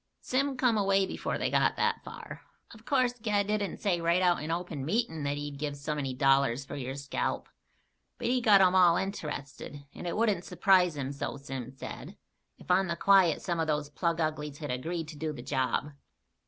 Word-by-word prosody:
"Sim 270 +1 -1
come 240 -4 +3
away 195 -1 +3
before - - -3
they - - -1
got - - +3
that - - 0
far. - - -9 0.3
Of 220 0 -16
course 255 -3 +2
Ged 210 -3 +1
didn't 205 -1 -1
say 180 -5 0
right 170 +2 +3
out 175 -1 +3
in 155 - -5
open 165 -4 -3
meetin' 170 - -1
that 140 0 -1
he'd 145 -1 -6
give 145 -1 -3
so 145 +2 -3
many 140 -3 -2
dollars 135 -1 +3
for 145 - -7
your 135 -1 -4
scalp. 140 0 -3 0.7
But 245 - -6
he 250 +1 +2
got 210 -4 +6
'em 185 -1 +5
all 175 -2 +6
int'rested, 150 -6 -5
and - - -7
it 170 - -2
wouldn't 215 -6 +1
surprise 180 -5 +3
him, 135 -1 -3
so 140 0 -4
Sim 135 -3 -6
said, 130 -1 -9 0.4
if - - -5
on 190 +1 +4
the 170 - -1
quiet 190 -2 +4
some 175 -3 -1
of 160 - 0
those 150 -1 -1
plug 170 +2 -1
uglies 150 -2 -2
had 145 -3 -5
agreed 160 +6 -3
to 155 - -9
do 155 +1 -3
the 120 -4 -8
job." 135 +2 -1
165 Hz, 205 wpm, -30 LUFS, 145-195 Hz, 0.7 s, got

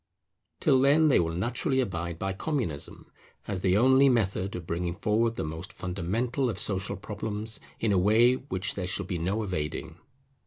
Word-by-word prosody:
Till 130 - +4
then 150 +3 +5
they 135 - +5
will 80 -1 -1
naturally 120 - 0
abide 85 -8 -2
by 95 +2 -2
Communism, 110 - -4 0.4
as 95 -3 -3
the 95 0 +3
only 130 +4 +5
method 100 -5 0
of 90 -2 -6
bringing 85 +1 -2
forward 115 +3 +1
the - - -3
most 80 +4 -6
fundamental 110 +9 -2
of - - -3
social 95 0 -1
problems 105 +2 -3 0.2
in 110 - +1
a 95 - +3
way 110 +6 +5
which 125 -8 -2
there 90 -3 -4
shall 95 +2 0
be 90 -2 -3
no 95 +7 -1
evading. 80 -2 -4
100 Hz, 170 wpm, -28 LUFS, 90-120 Hz, 0.4 s, then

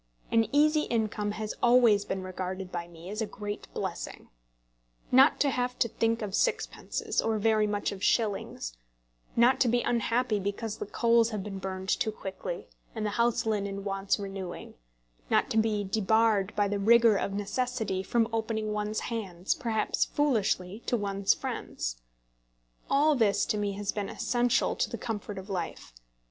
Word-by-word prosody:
An 225 -1 +4
easy 305 +1 +4
income 215 -2 -1
has 215 0 -4
always 235 -4 +5
been 190 -1 -3
regarded 185 0 -5
by 170 -1 -4
me 170 0 -12
as 215 +2 -3
a 220 - -1
great 205 0 -6
blessing. - - -5 0.8
Not 265 +4 +6
to 280 - +3
have 250 0 -1
to - - +2
think 230 0 0
of 200 -2 -4
sixpences, - - -1
or 225 -1 0
very 215 0 +3
much 205 0 -1
of 200 -1 -7
shillings; 200 - 0 0.6
not 240 +3 +5
to 255 - +4
be 240 +1 +2
unhappy 235 -1 +1
because 205 +2 -3
the - - -5
coals 230 +1 +3
have 210 -4 -4
been 195 -1 -6
burned 190 0 -5
too 220 - +1
quickly, 210 - -6 0.3
and 220 -1 -2
the 210 - 0
house 235 +1 +1
linen 200 -2 -1
wants 195 0 0
renewing; 195 -3 -6 0.6
not - - +2
to - - 0
be 220 -2 +2
debarred 210 0 +2
by 205 -1 +2
the 200 0 -1
rigour 230 +1 +6
of 195 - -1
necessity 210 -1 -1
from 225 +3 +1
opening 220 -1 -1
one's 210 +1 -2
hands, 195 -6 -2
perhaps 225 -5 0
foolishly, 215 -8 0
to 240 - +2
one's 200 -2 +1
friends; - - -4 0.9
all 295 +3 +4
this 220 -7 +2
to - - -1
me 205 -1 -1
has 200 0 -2
been 205 -2 -3
essential 245 -1 +1
to - - 0
the 230 - -4
comfort 210 -3 -5
of 190 0 -7
life. 175 - -5
210 Hz, 165 wpm, -29 LUFS, 195-230 Hz, 0.9 s, Not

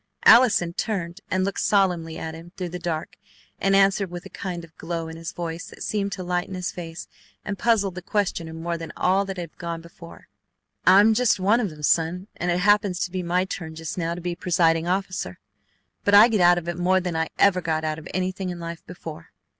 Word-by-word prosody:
Allison 215 -8 +6
turned 175 -5 -3
and 185 0 +1
looked 200 - -2
solemnly 180 -5 +1
at 160 - -5
him 165 +2 -11
through 180 -2 -3
the 180 +1 -6
dark, 160 -3 -4 0.4
and 195 0 +3
answered 195 0 +3
with 175 0 -8
a - - -10
kind 180 -3 -5
of 165 -1 -15
glow 165 -1 -4
in 160 - -8
his 165 0 -6
voice 170 0 -5
that - - -10
seemed 200 -2 -1
to 185 - -5
lighten 180 +1 -2
his 180 -1 -3
face 165 -2 -8 0.4
and 200 -2 -4
puzzled 215 -5 +2
the 180 - -7
questioner 175 -4 -1
more 170 +1 -3
than 165 - -6
all 190 +2 +2
that 195 -1 -5
had 170 -3 -7
gone 170 -1 -4
before: 170 0 -13 0.6
"I'm 200 +4 +7
just 240 -2 +2
one 205 +5 +3
of 215 -5 0
them, 150 -2 -12
son, 170 +4 +1
and 175 - -2
it 175 +1 +1
happens 205 -2 +3
to 180 - -1
be 185 0 -2
my 180 +1 +1
turn 160 -4 -6
just 160 0 -5
now 170 -1 -2
to 175 - -7
be 175 0 -2
presiding 165 -2 +2
officer; 185 - -2 0.7
but 205 - +4
I 215 +4 +9
get 215 -4 +1
out 175 0 +6
of 175 -1 -4
it 175 0 -3
more 185 +1 +3
than 180 -2 -3
I 160 0 0
ever 185 -2 +4
got 160 -2 -1
out 155 0 -2
of 160 - -11
anything 185 +1 -2
in 175 -1 -5
life 170 0 -7
before." 165 -2 -9
175 Hz, 225 wpm, -24 LUFS, 165-190 Hz, 0.7 s, I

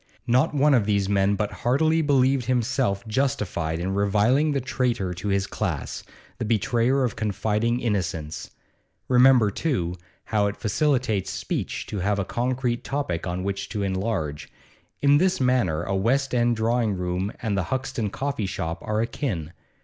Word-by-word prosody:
Not 130 +6 +2
one 145 +1 +4
of 115 -6 +3
these 100 -2 +1
men 100 0 +2
but 105 +1 -2
heartily 155 +6 +2
believed 135 -3 +2
himself 120 -3 0
justified 105 - -1
in 95 +3 -2
reviling 105 +9 +2
the 140 - +1
traitor 120 -7 -1
to 90 +4 -6
his 100 -1 +1
class, - - -3 0.4
the - - -1
betrayer 120 +4 +1
of 120 -5 -1
confiding 110 +3 0
innocence. 90 -9 -2 0.6
Remember, 125 -4 +5
too, 95 - -1 0.3
how 105 -2 +1
it 100 - -4
facilitates 115 -5 0
speech - - -3
to 105 - -5
have 100 +2 0
a 100 - -1
concrete 125 +1 -1
topic 130 - -2
on 90 +1 -3
which 100 0 -3
to 105 -3 -2
enlarge; 95 -6 -2 0.5
in 145 +1 +6
this 185 +1 +2
matter 120 - +1
a 95 +2 -2
West 130 +8 +1
End 120 -1 +2
drawing 115 -1 +1
room 90 +2 -2
and 110 -4 -1
the 95 -2 0
Hoxton 130 -2 -2
coffee 135 -2 -2
shop 85 -2 -3
are 110 +1 -1
akin. 105 - -3
110 Hz, 155 wpm, -25 LUFS, 95-130 Hz, 0.6 s, in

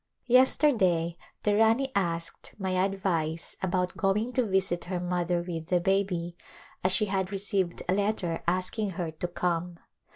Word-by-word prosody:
Yesterday 230 - +4 0.3
the 205 -1 +2
Rani 225 +5 +3
asked 170 -5 -2
my 190 -2 -2
advice 185 -4 -1
about 180 -1 -1
going 210 +5 0
to 255 - +2
visit 190 -3 0
her 180 0 -3
mother 175 -1 -1
with 165 -2 -5
the 180 0 +2
baby, 180 -2 0 0.5
as 185 - +3
she 190 +3 +5
had 190 -1 -1
received 195 -3 -1
a 180 - +2
letter 200 -4 -1
asking 185 +4 0
her 170 -3 -2
to 160 +3 -4
come. 175 0 -2
185 Hz, 150 wpm, -28 LUFS, 175-200 Hz, 0.5 s, she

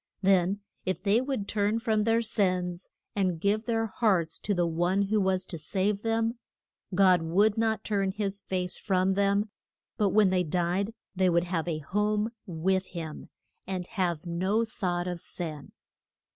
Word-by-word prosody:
Then 190 +1 +3 0.2
if 185 - -2
they 215 +3 +3
would 260 -7 -3
turn 210 +1 +1
from 220 -2 +1
their 225 +2 +2
sins, 185 -5 -1 0.3
and 185 -5 0
give 205 +5 +1
their 225 -2 +1
hearts 190 -6 +1
to 205 - -1
the 175 -1 +2
One 175 +4 +1
who 210 +1 +1
was 190 -1 +1
to 170 - -7
save 195 +5 0
them, 225 +1 0 0.6
God 185 -2 +5
would 200 +6 +3
not 225 -1 0
turn 200 -2 0
his 200 0 -3
face 180 -2 -2
from 190 -1 +2
them, 200 +1 +1 0.5
but 205 -2 +3
when 205 -1 +4
they 185 -1 +3
died 180 +6 -1 0.2
they 185 0 +3
would 170 0 +3
have 175 -2 -2
a 165 -3 -1
home 210 +7 0 0.2
with 185 +2 0
him, 160 -3 -7 0.4
and 185 -2 -3
have 175 -6 -2
no 185 +7 +1
thought 180 -6 -2
of 175 -2 -4
sin. 155 -5 -5
190 Hz, 165 wpm, -28 LUFS, 180-210 Hz, 0.6 s, God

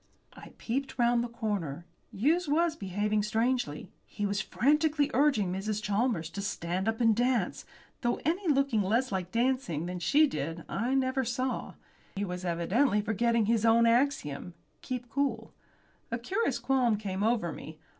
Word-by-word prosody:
I - - -13
peeped 270 +4 -3
round 240 -1 +3
the - - -3
corner. 205 - -3 0.3
Hughes 310 - +1
was 320 +2 +2
behaving 210 - -1
strangely. 225 - -1 0.2
He 205 - -4
was 200 +1 0
frantically 295 - +2
urging 245 -10 +2
Mrs. 205 +2 -2
Chalmers 205 -5 -1
to 200 - -5
stand 185 -1 -2
up 225 0 0
and 225 -2 +4
dance, 245 +1 0 0.4
though 240 -1 0
anyone 335 -1 +1
looking 275 -6 +2
less 230 +6 +1
like 185 -2 -3
dancing 235 - 0
than 180 0 -4
she 285 - +4
did 165 - -4
I 240 +6 -1
never 265 0 +1
saw. 255 +2 -3 0.4
He 200 +1 -1
was 180 -1 -5
evidently 190 +8 +1
forgetting 225 +2 +1
his 225 0 +1
own 230 +1 +5
axiom 230 - +1 0.3
keep 250 -1 -5
cool. 280 +3 -2 0.6
A 230 - -1
curious 385 - -1
qualm 250 -5 +2
came 195 -2 -4
over 215 -6 +1
me. 155 0 -9
230 Hz, 155 wpm, -29 LUFS, 195-260 Hz, 0.6 s, own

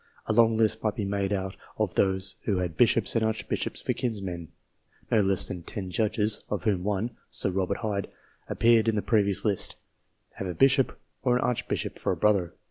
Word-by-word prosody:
A 110 - 0
long 115 0 +4
list 110 -1 +2
might 110 -2 0
be 105 - -2
made 100 0 -1
out 95 -1 -2 0.2
of - - 0
those 95 0 +1
who 100 -4 +1
had 90 -3 -2
bishops 115 +2 +3
and 115 - +2
archbishops 110 0 -2
for - - 0
kinsmen. 95 -8 -4 0.6
No 110 - +4
less 95 -2 +4
than 90 - -5
ten 95 +2 -6
judges 105 +1 0
of 105 - -2
whom 100 -5 +1
one, 105 +3 -1 0.2
Sir 95 - -1
Robert 95 +1 -1
Hyde, 100 -3 -2 0.4
appeared 115 -1 +4
in 110 - +2
the 105 - -1
previous 100 -2 +2
list 100 -3 0 0.6
have 95 - -4
a 90 - -4
bishop 135 - +3 0.2
or 125 -2 +2
an 125 - +1
arch 125 - -1
bishop - - -3
for - - 0
a - - -2
brother. 100 -5 +2
105 Hz, 200 wpm, -27 LUFS, 95-110 Hz, 0.6 s, long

